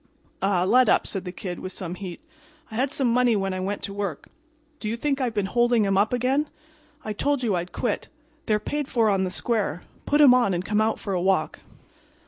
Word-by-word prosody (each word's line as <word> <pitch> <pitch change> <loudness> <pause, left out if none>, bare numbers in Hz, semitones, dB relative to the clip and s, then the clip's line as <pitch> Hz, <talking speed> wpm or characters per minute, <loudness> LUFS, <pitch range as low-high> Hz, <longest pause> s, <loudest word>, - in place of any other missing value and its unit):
"Ah, 195 -2 +2
let 245 +5 +4
up," - - +3
said 195 -2 -4
the 180 - -4
Kid, 180 -1 -6
with 185 - -6
some 175 -3 -5
heat. 185 +1 -7 0.5
"I - - -7
had 260 +4 0
some 270 -4 +1
money 240 0 +3
when 195 -2 -1
I 185 - -3
went 200 +2 -3
to 195 - -3
work. 200 -7 -4 0.5
Do 215 - -3
you 230 - -2
think 275 +2 -1
I've 240 -3 -1
been 205 -2 +1
holding 240 +1 +2
'em 195 -1 +1
up 200 +2 +3
again? 260 +5 +1 0.6
I 215 - -2
told 285 +4 0
you 220 -4 +1
I'd 175 +1 -3
quit. - - -2 0.4
They're 215 -2 +3
paid 290 +7 -3
for 225 -5 +2
on 190 -1 +1
the - - -2
square. 195 -4 -1 0.2
Put 295 - +3
'em 280 -4 +8
on 240 -7 +3
and 175 +1 -3
come 210 +2 +1
out 220 0 +1
for 200 - -4
a 180 - 0
walk." 190 +1 +1
210 Hz, 230 wpm, -25 LUFS, 190-245 Hz, 0.6 s, em